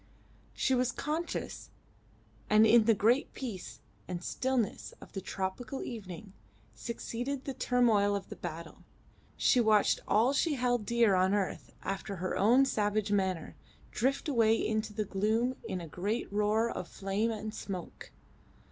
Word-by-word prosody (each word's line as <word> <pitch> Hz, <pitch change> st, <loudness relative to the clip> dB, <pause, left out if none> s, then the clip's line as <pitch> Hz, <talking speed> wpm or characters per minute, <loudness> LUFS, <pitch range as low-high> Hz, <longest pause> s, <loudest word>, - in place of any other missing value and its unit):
She 265 Hz, -, +1 dB
was 250 Hz, -1 st, +2 dB
conscious, 315 Hz, +7 st, -4 dB, 0.8 s
and 215 Hz, +1 st, +6 dB
in 225 Hz, 0 st, +6 dB
the 225 Hz, -1 st, +5 dB
great 235 Hz, +7 st, +2 dB
peace 225 Hz, -9 st, -7 dB, 0.3 s
and 180 Hz, -1 st, -5 dB
stillness 260 Hz, -1 st, -1 dB
of -, -, -13 dB
the 195 Hz, -, -4 dB
tropical 195 Hz, +9 st, -4 dB
evening 200 Hz, -3 st, -8 dB, 0.4 s
succeeding 245 Hz, +3 st, -4 dB
the 275 Hz, -, -4 dB
turmoil 225 Hz, -6 st, +3 dB
of 200 Hz, -1 st, -5 dB
the -, -, -7 dB
battle, 165 Hz, -1 st, -7 dB, 0.5 s
she 255 Hz, -, +4 dB
watched 215 Hz, -3 st, +4 dB
all 230 Hz, +6 st, +3 dB
she 300 Hz, +1 st, +1 dB
held 245 Hz, -4 st, 0 dB
dear 235 Hz, -3 st, +4 dB
on 185 Hz, +2 st, +3 dB
earth 200 Hz, -2 st, -3 dB
after 195 Hz, +1 st, -4 dB
her 185 Hz, +1 st, -3 dB
own 245 Hz, +7 st, +5 dB
savage 210 Hz, -4 st, 0 dB
manner, 190 Hz, -5 st, 0 dB, 0.4 s
drift 275 Hz, +6 st, 0 dB
away 225 Hz, -6 st, +4 dB
into 220 Hz, -1 st, -1 dB
the 215 Hz, 0 st, -2 dB
gloom 220 Hz, +6 st, 0 dB
in 185 Hz, -, -3 dB
a 170 Hz, -, -7 dB
great 200 Hz, +7 st, -3 dB
roar 210 Hz, +2 st, +2 dB
of 175 Hz, -, -5 dB
flame 195 Hz, +5 st, -1 dB
and 215 Hz, -1 st, -4 dB
smoke. 185 Hz, -5 st, -7 dB
215 Hz, 145 wpm, -31 LUFS, 195-245 Hz, 0.8 s, and